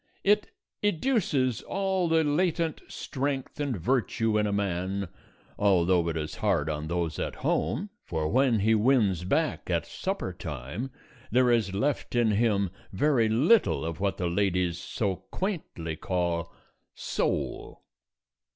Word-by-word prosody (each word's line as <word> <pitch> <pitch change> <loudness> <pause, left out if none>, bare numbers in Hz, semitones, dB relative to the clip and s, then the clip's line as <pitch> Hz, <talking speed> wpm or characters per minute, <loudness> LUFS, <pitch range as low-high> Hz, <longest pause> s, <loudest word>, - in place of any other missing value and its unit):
It 210 +1 +3 0.3
educes 170 - +1
all 190 -2 0
the 160 0 +4
latent 165 +1 0
strength 135 0 -3
and 140 -6 -1
virtue 115 +2 +1
in 105 - +1
a - - -1
man 95 -1 -1 0.5
(although 90 -4 +3
it 80 - -2
is 75 -1 -4
hard 85 -8 +1
on 75 0 -4
those 85 -2 -2
at - - -3
home, 195 - 0
for 80 -2 -2
when 125 - +3
he 110 +3 +4
wins 105 -6 +3
back 155 - 0
at 85 -2 +1
supper 190 - -3
time 80 - -5 0.4
there 125 0 +4
is 105 -5 +1
left 135 +4 -1
in 120 -2 +3
him 100 -3 +2 0.2
very 115 +1 +2
little 140 - +3
of 80 -1 -4
what 100 0 0
the 90 - -2
ladies 90 -1 +1
so 100 -1 -2
quaintly 150 - -3
call 85 -2 -1 0.4
"soul"). - - -2
105 Hz, 135 wpm, -28 LUFS, 90-140 Hz, 0.5 s, the